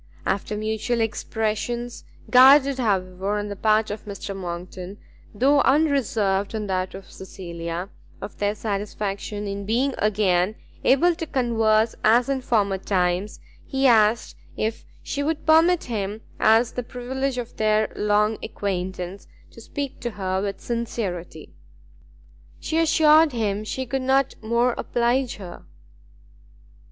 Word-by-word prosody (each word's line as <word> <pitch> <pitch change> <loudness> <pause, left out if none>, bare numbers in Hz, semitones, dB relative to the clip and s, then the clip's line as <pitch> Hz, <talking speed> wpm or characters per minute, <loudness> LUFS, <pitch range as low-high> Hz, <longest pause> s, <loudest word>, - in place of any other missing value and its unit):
After 200 +2 -1
mutual 220 +3 -1
expressions, 225 +2 -2 0.2
guarded, 265 +2 +6
however, 195 -2 -1
on 205 0 -3
the 205 - -5
part 215 +1 +2
of 210 +1 -7
Mr. 200 -1 -6
Monckton, 180 +1 -7 0.3
though 275 +6 +3
unreserved 230 -9 +1
on 215 -1 -3
that 185 -1 -2
of 195 -1 -11
Cecilia, 170 -2 -6 0.3
of - - -8
their 205 0 0
satisfaction 205 0 -4
in 200 0 -4
being 245 +7 0
again 200 -2 +2 0.3
able 340 +7 +4
to 325 -1 -6
converse 225 -4 +2
as 235 +4 +4
in 270 -1 0
former 200 -6 +1
times, 185 +1 -1 0.3
he 270 0 0
asked 225 -2 +4 0.2
if 220 +1 -2 0.2
she 285 - -3
would 310 +1 -2
permit 325 +2 +5
him, 210 -2 -4 0.2
as 225 +2 +4
the 250 - -3
privilege 250 +2 -4
of 240 -2 -6
their 215 0 +1
long 210 +1 +1
acquaintance, 185 -1 -4 0.2
to 230 - -13
speak 280 +4 -5
to 240 - -3
her 190 -3 -2
with 200 -1 -3
sincerity. 195 -9 -4 1.1
She 320 +1 -1
assured 315 -2 +5
him 210 -3 -1
he 260 +4 -3
could 265 +2 -2
not 265 +1 +2
more 235 +2 +1
oblige 245 +2 0
her. 180 -4 -10
215 Hz, 130 wpm, -23 LUFS, 195-250 Hz, 1.1 s, guarded